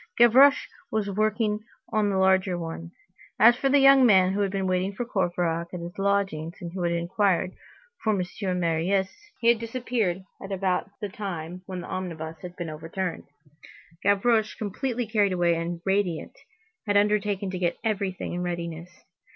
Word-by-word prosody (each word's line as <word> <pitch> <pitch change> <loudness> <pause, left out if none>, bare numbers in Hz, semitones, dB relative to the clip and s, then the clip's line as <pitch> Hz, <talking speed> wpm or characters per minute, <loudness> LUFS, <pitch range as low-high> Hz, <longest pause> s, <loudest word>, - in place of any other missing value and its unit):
Gavroche 260 +5 +6 0.2
was 210 -2 -1
working 215 +1 0 0.3
on 215 -1 +2
the 195 - 0
larger 190 -1 +3
one. 165 0 -6 0.5
As 235 +2 +8
for 270 +2 0
the 285 - +5
young 275 -1 +7
man 190 -5 +5
who 200 - -1
had 200 -1 +1
been 195 0 -2
waiting 185 +1 0
for 240 +5 -4
Courfeyrac 175 -5 -1
at - - -4
his 170 +1 -7
lodgings, 195 -5 0
and 170 -1 -7
who 185 - -4
had 170 -1 +1
inquired 180 +2 +1 0.5
for 215 -3 +1
M. 180 0 -3
Marius, 175 +3 0 0.3
he 230 - +4
had 235 -1 +4
disappeared 230 -6 -2 0.2
at 195 - -8
about 190 -1 -1
the 205 - -3
time 180 -3 -6
when 185 -2 -5
the - - -9
omnibus 165 -3 -5
had 180 -1 -8
been 175 -2 -5
overturned. 165 +3 -4 0.8
Gavroche, 215 +2 +2
completely 240 +4 -3
carried 205 -3 +1
away 175 -1 +2
and 170 +1 -3
radiant, 190 -4 -1 0.5
had 205 0 +3
undertaken 205 -2 +1
to 185 - -4
get 175 -1 0
everything 200 -6 -2
in 175 - -3
readiness. 170 -1 -4
190 Hz, 165 wpm, -26 LUFS, 175-210 Hz, 0.8 s, As